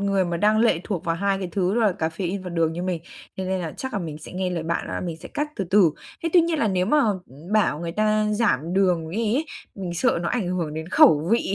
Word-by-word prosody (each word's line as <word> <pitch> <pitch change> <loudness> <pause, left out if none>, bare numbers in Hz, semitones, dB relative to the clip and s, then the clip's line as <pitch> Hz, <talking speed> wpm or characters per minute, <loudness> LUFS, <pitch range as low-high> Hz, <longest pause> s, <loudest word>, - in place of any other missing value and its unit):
người 195 -1 +1
mà 170 -1 -2
đang 215 +4 +3
lệ 225 -8 +3
thuộc 195 -6 -3
vào 165 -1 0
hai 195 +2 0
cái 185 -2 -4
thứ 190 +2 +1
đó 240 - +2
là 215 -4 +3
caffeine 175 +4 -2
và 180 - -6
đường 165 -2 +1
như 175 +2 -4
mình, 180 -3 -2 0.3
cho 190 - -3
nên 185 0 -1
là 160 -3 -4
chắc 265 0 -5
là 205 - -1
mình 155 -4 -5
sẽ 155 - -11
nghe 185 0 -2
lời 170 -3 -2
bạn 170 +1 -2
là - - -3
mình 170 -3 -4
sẽ 160 - -11
cắt 300 0 -1
từ 195 - -1
từ. 195 -5 +6 0.3
Thế 330 - 0
tuy 355 - +7
nhiên 330 -2 0
là 225 - +2
nếu 185 -1 +1
mà, 300 +6 +3
ừm, 180 - -3
bảo 210 -8 +2
người 170 -1 -4
ta 215 +2 +2
giảm 175 - +1
đường 175 -4 +2
đi 220 +3 0
ấy, 310 - 0 0.3
mình 180 -3 -5
sợ 250 +3 +2
nó 170 - -1
ảnh 215 -8 -1
hưởng 170 -4 -2
đến 160 +1 -5
khẩu 160 -3 +5
vị, 230 -4 +1
185 Hz, 280 wpm, -24 LUFS, 170-210 Hz, 0.3 s, tuy